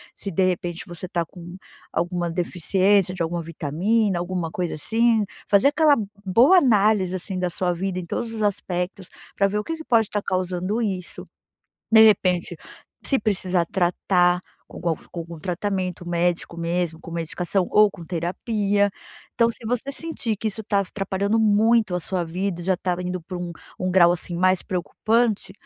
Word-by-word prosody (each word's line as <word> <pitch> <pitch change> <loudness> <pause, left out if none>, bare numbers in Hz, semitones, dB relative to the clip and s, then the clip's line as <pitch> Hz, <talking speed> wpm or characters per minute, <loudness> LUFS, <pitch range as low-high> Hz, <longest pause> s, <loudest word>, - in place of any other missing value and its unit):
se 200 - -6
de 190 +2 +1
repente 175 -2 -1
você 175 +1 -6
tá 175 -1 -1
com 175 +1 -11 0.3
alguma 175 +1 -1
deficiência 185 +2 +1
de 180 - -6
alguma 170 +1 -1
vitamina, 175 +6 0
alguma 175 -1 -2
coisa 175 +1 -3
assim, 225 +7 +2 0.2
fazer 200 +5 +5
aquela 295 0 +4 0.3
boa 240 - +6
análise, 210 - +3
assim, 185 +1 -4
da 180 -1 -1
sua 180 +1 0
vida 185 +1 -2
em 180 - -6
todos 230 +6 -3
os 220 - -4
aspectos 185 -2 -2 0.3
pra 200 - +3
ver 205 +1 -1
o - - -3
que 325 +6 -4
que 320 - -8
pode 225 -3 +3
estar 205 0 -3
causando 185 +4 -1
isso. 190 -5 -3 0.7
De 220 -1 +8
repente 185 -4 +2 0.5
se 270 - +2
precisa 185 -5 0
tratar 180 0 +2 0.3
com - - -10 0.3
com - - -8
algum 170 0 -8
tratamento 180 +1 -3
médico, 175 0 -1
mesmo 170 -1 -2
com - - -10
medicação 175 +3 -1
ou 210 -1 +6
com 175 -3 -11
terapia. 200 +4 0 0.5
Então, 230 -1 +3
se 230 - -7
você 245 +4 -1
sentir 275 -7 -3
que 220 - -2
isso 215 +1 -5
tá 205 -1 +1
af 195 - -5
atrapalhando 200 +2 -1
muito 215 -1 +3
a 180 - -1
sua 180 +1 -2
vida, 175 +1 -3
já 185 +1 +1
tá 180 0 -1
indo 180 0 -3
para 180 +2 -6
um 175 0 -4 0.3
um 185 0 0
grau, 175 -2 +6
assim, 175 0 -5
mais 185 +1 +2
preocupante, 215 +4 0
185 Hz, 175 wpm, -23 LUFS, 175-210 Hz, 0.7 s, De